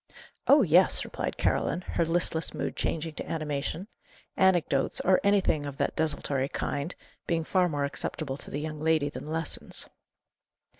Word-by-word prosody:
"Oh, 285 -1 +7
yes!" 180 +1 +4
replied - - -4
Caroline, 165 +5 +1
her 175 - -1
listless 165 -1 0
mood - - -3
changing 160 0 -2
to - - -5
animation; 155 +3 -3 0.5
anecdotes, 175 -8 +2
or 185 0 +3
anything 200 -7 +3
of 140 -1 -7
that - - 0
desultory 140 -3 0
kind, 145 +4 -3 0.3
being 165 -1 +1
far 180 +2 +2
more 145 -2 0
acceptable 140 0 -4
to - - -10
the 145 - -3
young 155 0 -5
lady 155 -2 +2
than 145 - -8
lessons. 160 0 -2
160 Hz, 150 wpm, -28 LUFS, 145-175 Hz, 0.5 s, Oh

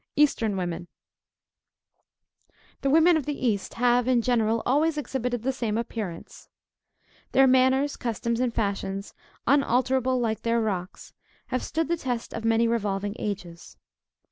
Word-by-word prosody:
EASTERN 230 -9 +2
WOMEN. 175 -1 -3 1.9
The 275 - +1
women 325 +3 +5
of 295 - -4
the 295 - -2
East, 215 -6 -1
have 245 0 +2
in 245 -2 +3
general, 225 -2 +1
always 300 +4 +2
exhibited 250 -5 -2
the 265 - +1
same 225 -4 -2
appearance. 220 -7 -6 0.8
Their 270 - +6
manners, 260 +2 +3
customs, 235 0 -2
and 250 -1 +1
fashions, 200 -2 -3 0.3
unalterable 260 -1 +2
like 225 -2 -1
their 230 0 +1
rocks, 195 -4 -4 0.4
have 255 - -1
stood 325 0 -2
the 340 +1 0
test 245 -6 -4
of 225 - -5
many 225 +1 +3
revolving 205 -3 -1
ages. 180 -5 -6
235 Hz, 135 wpm, -26 LUFS, 215-260 Hz, 1.9 s, Their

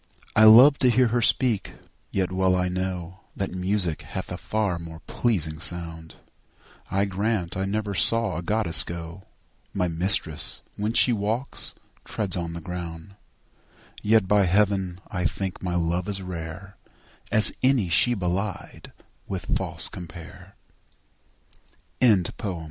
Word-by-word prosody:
I 110 - +7
love 125 +7 +8
to 130 - +4
hear 125 0 +3
her 120 +2 0
speak, 120 -3 +1 0.3
yet 95 -1 -1
well 95 0 +2
I 90 0 0
know 90 0 -4 0.2
That 100 - -3
music 90 -2 -1
hath - - -6
a - - -4
far 105 -5 -2
more 80 -1 -10
pleasing 80 -10 -2
sound; 85 -1 -3 0.7
I 100 +1 +1
grant 100 -2 -2
I 95 +1 -1
never 105 +1 -2
saw 115 +1 +3
a - - -3
goddess 90 -3 +1
go; 85 +2 -8 0.5
My 90 -2 +1
mistress, 85 -2 0
when 105 +2 -2
she 120 +1 +4
walks, 110 +5 -3 0.3
treads 100 -4 -2
on 85 -2 -4
the 85 - -7
ground: 85 -1 -7
And 100 - -19 0.9
yet, 110 -2 +3
by 105 0 +3
heaven, 95 -1 +1
I 90 -2 -2
think 95 +2 -3
my 90 -2 -3
love 85 +1 -1
as 100 -1 0
rare 90 +1 -8 0.5
As 110 0 +9
any 130 -7 +2
she 120 +8 +3
belied 95 +1 -4 0.4
with 95 -3 -3
false - - +1
compare. 85 -2 -11 1.5
CXXXI. 100 -4 +1
95 Hz, 140 wpm, -25 LUFS, 85-105 Hz, 1.5 s, As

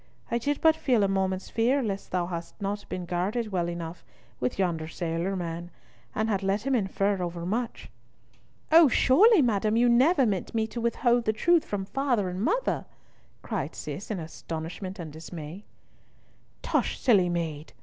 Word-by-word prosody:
I 235 - +1
did 285 +5 -1
but 320 -1 +5
feel 245 -9 +2
a - - +3
moment's 190 -1 -1
fear 250 +5 +2
lest 200 -3 -3
thou 180 -1 0
hadst 170 +1 -6
not 205 0 -4
been 180 -1 -4
guarded 195 +6 -2
enough 170 -1 -3 0.4
with 125 - -1
yonder 170 -4 0
sailor 170 +3 -2
man, 170 -1 -4 0.5
and 220 +1 0
had 200 -3 0
let 195 +3 0
him 275 - +1
infer 200 -3 +1
over 170 -1 -4
much." 230 +5 -3 0.8
"O, 325 0 +8
surely, 330 - +5
madam, 215 -1 +1
you 240 +1 +4
never 260 +5 +5
meant 200 +1 -2
me 220 -1 +2
to 235 +2 -6
withhold 235 0 +2
the 220 - +2
truth 335 +9 +3
from 200 -2 -3
father 245 -4 0
and 180 +1 -4
mother," 465 - 0 0.6
cried - - -3
Cis, 195 - -6
in 210 -4 -2
astonishment 165 +3 -6
and 160 -5 -7
dismay. 160 +3 -8 1.0
"Tush! - - 0
silly 200 -9 +4
maid!" 160 -3 -3
195 Hz, 165 wpm, -27 LUFS, 175-235 Hz, 1.0 s, O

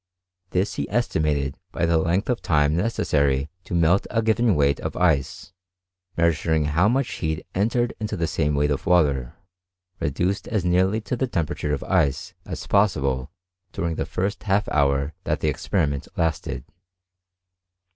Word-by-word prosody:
This 95 +3 0
he - - -2
estimated 75 - 0 0.2
bv 85 - +1
the 85 -1 +3
length 85 +5 0
of 125 -2 0
time 75 -1 +2
necessary, 70 - +1
to - - -4
melt 85 +3 +3
a 115 -1 0
given 110 -1 +3
weight 70 -1 +2
in - - -2
ice, 80 0 0 0.6
measuring 80 -2 +2
how 80 +7 +2
much 130 +3 +1
heat 80 0 -3
entered 115 +5 +1
into 110 -3 -3
the 85 - 0
same 75 -2 0
weight 75 +1 +2
of 70 - -2
water, 70 -8 +2 0.6
reduced 90 +8 -1
as 105 -5 -1
nearly 95 +5 +2
to 115 - -3
the 130 +2 -1
tem 85 -9 0
perature 75 0 -3
of 75 - -2
ice 70 -1 0
as - - -6
possible 70 -11 +1 0.4
during 85 -1 -2
the - - -3
first 100 +3 -2
half 100 0 +1
hour 70 0 +1
that - - 0
the - - +2
experiment 75 -8 -1
lasted. 80 -6 -1
85 Hz, 155 wpm, -24 LUFS, 75-100 Hz, 0.6 s, the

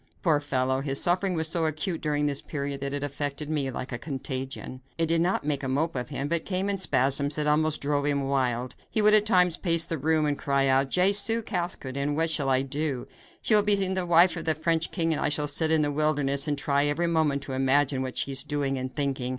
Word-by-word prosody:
Poor 160 -6 +2
fellow, 130 -2 -1
his 135 -1 0
suffering 180 +1 +2
was 160 -1 +3
so 165 +1 -1
acute 155 +2 -3
during 150 -1 -1
this 140 -1 -1
period 140 -2 -5
that 140 0 -3
it 145 0 -2
affected 145 +1 -4
me 145 -3 -1
like 130 +1 -6
a 120 - -4
contagion. 130 -2 -6 0.2
It 165 - +2
did 165 +1 +1
not 180 +3 0
make 145 -2 -1
a 135 - -4
mope 150 +5 -1
of 125 +1 -4
him, 140 -1 -4
but 170 +1 -1
came 195 +1 -2
in 195 - -2
spasms 140 -2 +3
that 150 - -1
almost 155 +1 +1
drove 145 0 -1
him 140 -1 0
wild. 130 -2 -1
He - - -1
would 210 0 +4
at 215 0 +4
times 180 -4 +3
pace 170 -2 +3
the 165 -2 -4
room 155 +2 +1
and 145 -1 -2
cry 140 -1 0
out: 135 0 +2
"Jesu! 200 +6 +3
Caskoden, 145 -8 -3
what 165 +1 0
shall 145 -3 0
I 130 0 +2
do? 140 -1 -3 0.4
She - - +2
will 210 - +7
be 205 0 +4
the 190 -2 0
wife 170 +1 +5
of 165 - -6
the 160 -1 +1
French 160 +1 0
king, 165 -3 0
and - - -2
I - - +1
shall 150 0 +1
sit 155 +2 +1
in 160 -1 +3
the 145 - -1
wilderness 145 -1 +1
and 145 -1 -1
try 140 +1 +1
every 150 +4 0
moment 155 -4 0
to 135 - -7
imagine 135 +1 +1
what 130 -1 -5
she 140 - 0
is 135 0 0
doing 140 -2 -2
and 130 0 -6
thinking. 135 -3 -2
145 Hz, 240 wpm, -26 LUFS, 135-165 Hz, 0.4 s, will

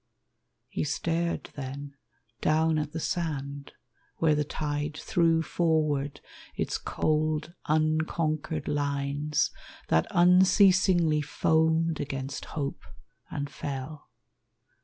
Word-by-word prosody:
He - - -3
stared 165 +3 -1
then 140 0 -6 0.5
Down 160 0 +3
at 150 -1 -3
the 160 - -4
sand 145 -5 -3 0.4
where 160 -2 +3
the 150 0 +1
tide 150 0 -3
threw 165 -1 +2
forward 155 -5 0 0.3
Its - - -2
cold, 155 +1 0
unconquered 155 0 0
lines, 145 +1 0 0.4
that 80 - +3
unceasingly 180 -2 +5
Foamed 160 +2 +2
against 135 -1 -4
hope, 140 -3 -4 0.5
and 145 0 -3
fell. 140 +1 -6
155 Hz, 95 wpm, -28 LUFS, 145-160 Hz, 0.5 s, unceasingly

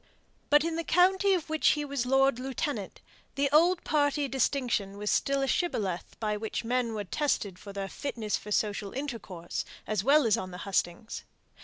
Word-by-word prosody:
But 295 0 +6
in 330 0 -1
the 335 - -1
county 380 +3 +4
of 340 -4 -3
which 315 -1 +1
he 295 - -2
was 275 -3 -2
lord 270 -1 +3
lieutenant, 260 -5 -3 0.3
the 280 0 +1
old 335 +4 +4
party 290 -1 +1
distinction 245 -7 0
was 210 0 -1
still 275 0 +1
a - - 0
shibboleth 205 - -1
by 210 -1 -1
which 220 +2 -3
men 240 -1 0
were 210 - -2
tested 205 -5 -1
as - - -16
to 200 - -7
their 195 -1 -3
fitness 220 -2 -3
for 210 - -7
social 205 -1 -1
intercourse, 225 -11 -5 0.2
as 210 -3 -1
well 285 +3 +5
as 220 - +3
on 185 - -4
the 180 - -8
hustings. 195 +2 -2
255 Hz, 185 wpm, -29 LUFS, 205-290 Hz, 0.3 s, But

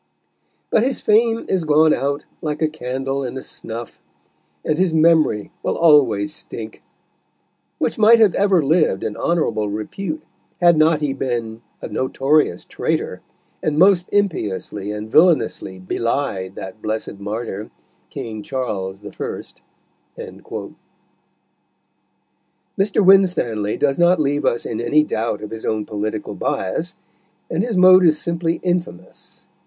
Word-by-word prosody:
But - - +4
his 260 +3 0
Fame 225 +2 +2
is 185 -3 0
gone 155 0 +4
out 140 +1 -2 0.2
like 150 -1 -3
a - - +4
Candle 135 -2 -3
in 130 0 -5
a - - -5
Snuff, 115 +1 -7 0.7
and 155 +2 0
his 180 -3 +2
Memory 155 -9 +3
will - - -2
always 130 -11 +4
stink, 110 -1 -8 1.0
which - - -2
might 220 +2 +7
have 215 -5 +4
ever 195 -5 +3
lived 155 - +2
in 110 -2 -3
honourable 115 -11 0
Repute, 155 - -5 0.4
had 175 -1 +5
not 155 0 +3
he 145 -2 0
been 120 -4 -3 0.2
a - - -3
notorious 135 - 0
Traytor, - - -3 0.4
and 150 -1 -1
most 180 0 +4
impiously 105 - -1
and 105 +1 -6
villanously 155 - +3
bely'd 95 -1 -2
that 95 +3 -8
blessed 110 -2 -4
Martyr, 105 0 -5 0.4
King 110 -2 -6
Charles 100 -6 -4
the 105 - -9
First." - - -7 0.6
Mr. - - -8 2.3
Winstanley 175 - +3
does 140 +1 +1
not 175 0 +4
leave 145 -1 0
us 120 - +1
in 115 0 -3
any 150 +6 +3
doubt 115 -7 -2
of 105 - -7
his 110 0 -7
own 110 -1 -1
political 110 0 -4
bias, 160 - -2 0.6
and 165 - 0
his 225 -3 -2
mode 185 0 +7
is 155 -3 +4
simply 170 0 -1
infamous. 175 - -4
140 Hz, 135 wpm, -20 LUFS, 110-170 Hz, 2.3 s, might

